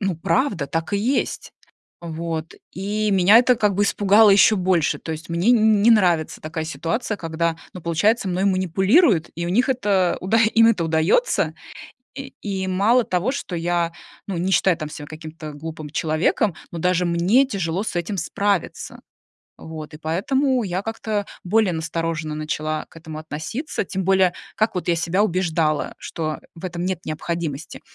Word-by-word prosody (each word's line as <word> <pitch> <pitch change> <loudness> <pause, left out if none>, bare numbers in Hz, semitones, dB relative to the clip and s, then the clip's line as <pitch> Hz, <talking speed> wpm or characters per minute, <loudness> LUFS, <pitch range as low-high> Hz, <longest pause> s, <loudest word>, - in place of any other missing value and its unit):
ну, 195 -5 -1
правда, 190 - 0
так 165 +5 -3
и - - +3
есть. 250 +7 -1 0.5
Вот. 165 -1 -5 0.2
И 210 +3 -2
меня 195 +3 +6
это 250 +1 +4
как 210 -3 +1
бы 205 - +1
испугало 205 +1 +5
ещё 205 +2 +6
больше, 180 -4 +1
то 160 - -5
есть 160 +2 -8
мне 170 +7 +1
н 220 -3 +4
не 235 - +6
нравится 175 -7 +2
такая 160 0 -4
ситуация, 205 +8 -3
когда, 165 -1 -2 0.2
ну, 180 - -7
получается, 200 +6 +1
мной 185 +2 -1
манипулируют, 190 - +3
и 170 - -4
у - - -2
них 245 +8 +2
это 200 -8 +1
уда 205 +5 +1
э, 220 -1 +5
им 225 0 +6
это 185 -7 +1
удаётся. 160 - +1 0.6
И 270 -1 -8
и 190 -2 -3
мало 215 +7 +3
того, 185 +8 0
что 200 -10 -5
я, 170 0 -1 0.3
ну, 190 -3 -3
не 185 +3 -1
считаю 180 0 +3
там, 155 -2 -5
ся, 150 -1 -8
каким-то 155 0 -9
глупым 155 0 -7
человеком, 160 +4 0 0.2
но 170 - -6
даже 180 +1 +1
мне 180 +11 +3
тяжело 190 -3 -2
с 220 - -5
этим 175 +3 -2
справиться. 200 0 -2 0.6
Вот. 155 -1 -9
И - - -8
поэтому 250 - 0
я 185 0 -2
как-то 220 -1 -3 0.2
более 210 0 +2
настороженно 160 -1 -3
начала 155 0 -3
к - - -15
этому 155 -1 -8
относиться, 160 - -4
тем 190 +1 -3
более, 190 -1 +3 0.2
как 215 -1 0
вот 180 - -3
я 170 - +3
себя 175 +5 +1
убеждала, 165 -5 0
что 155 -2 -4 0.2
в 165 - -8
этом 175 -1 -4
нет 185 -2 -3
необходимости. 160 -1 -4
180 Hz, 170 wpm, -22 LUFS, 165-205 Hz, 0.6 s, меня